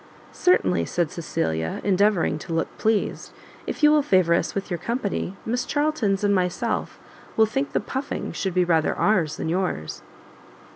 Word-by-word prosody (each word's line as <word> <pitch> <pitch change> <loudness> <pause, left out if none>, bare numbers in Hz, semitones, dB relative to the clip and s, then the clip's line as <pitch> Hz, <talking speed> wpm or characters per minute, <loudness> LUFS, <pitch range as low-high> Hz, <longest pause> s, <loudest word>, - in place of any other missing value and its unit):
"Certainly," 360 - +2
said 170 -3 -1
Cecilia, 80 - -2
endeavouring 200 -5 +2
to 165 - -6
look 165 - -2
pleased, 220 -1 0 0.4
"if - - -5
you 300 - +8
will 305 -1 +5
favour 185 -9 +3
us - - 0
with 195 0 -4
your 175 - -1
company, 215 -5 -2
Miss 245 +2 -1
Charltons 290 -10 0
and 205 0 +3
myself 180 -2 -1 0.4
will 220 - +6
think 270 +6 -2
the - - +2
puffing 275 +2 -4
should 190 -2 -3
rather 160 -2 +2
be - - -10
ours 170 -8 +2
than - - -3
yours." 170 - -2
195 Hz, 160 wpm, -24 LUFS, 170-225 Hz, 0.4 s, you